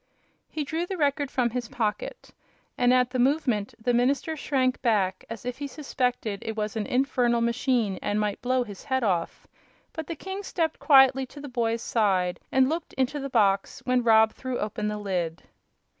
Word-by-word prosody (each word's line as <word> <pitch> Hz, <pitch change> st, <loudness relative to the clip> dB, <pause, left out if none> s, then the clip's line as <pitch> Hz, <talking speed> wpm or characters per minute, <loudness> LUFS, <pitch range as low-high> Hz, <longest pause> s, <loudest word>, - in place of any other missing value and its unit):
He 310 Hz, -, -3 dB
drew 325 Hz, +5 st, -3 dB
the 380 Hz, -, -4 dB
Record 285 Hz, -2 st, +1 dB
from 245 Hz, -3 st, 0 dB
his 245 Hz, -2 st, -4 dB
pocket, 215 Hz, -4 st, -3 dB, 0.4 s
and 245 Hz, 0 st, +3 dB
at 250 Hz, -1 st, +3 dB
the 255 Hz, -, -2 dB
movement 250 Hz, -6 st, +1 dB
the 240 Hz, +2 st, 0 dB
minister 270 Hz, +6 st, +1 dB
shrank 260 Hz, -4 st, 0 dB
back 195 Hz, -6 st, +1 dB
as 230 Hz, +1 st, -7 dB
if 250 Hz, +1 st, -4 dB
he 285 Hz, -, -3 dB
suspected 250 Hz, -8 st, -2 dB
it 225 Hz, -, -4 dB
was 210 Hz, 0 st, -2 dB
an 215 Hz, -2 st, -2 dB
infernal 250 Hz, -2 st, +2 dB
machine 235 Hz, -4 st, 0 dB
and 205 Hz, +1 st, -1 dB
might 210 Hz, -1 st, -1 dB
blow 255 Hz, 0 st, +1 dB
his 205 Hz, -5 st, -10 dB
head 260 Hz, -2 st, 0 dB
off; 180 Hz, -6 st, -1 dB, 0.5 s
but 320 Hz, -3 st, -6 dB
the 335 Hz, -, -4 dB
king 385 Hz, +5 st, -6 dB
stepped 330 Hz, -5 st, -2 dB
quietly 270 Hz, -2 st, +5 dB
to 290 Hz, -, -12 dB
the 285 Hz, -, -7 dB
boy's 230 Hz, -2 st, -1 dB
side 190 Hz, -5 st, +1 dB
and 265 Hz, 0 st, +4 dB
looked 325 Hz, +3 st, -3 dB
into 265 Hz, +3 st, -1 dB
the 275 Hz, 0 st, -4 dB
box 200 Hz, -5 st, +1 dB
when 250 Hz, 0 st, +2 dB
Rob 220 Hz, -1 st, +5 dB
threw 255 Hz, -1 st, -4 dB
open 210 Hz, 0 st, -3 dB
the 210 Hz, 0 st, -2 dB
lid. 180 Hz, -5 st, -3 dB
245 Hz, 190 wpm, -26 LUFS, 215-270 Hz, 0.5 s, quietly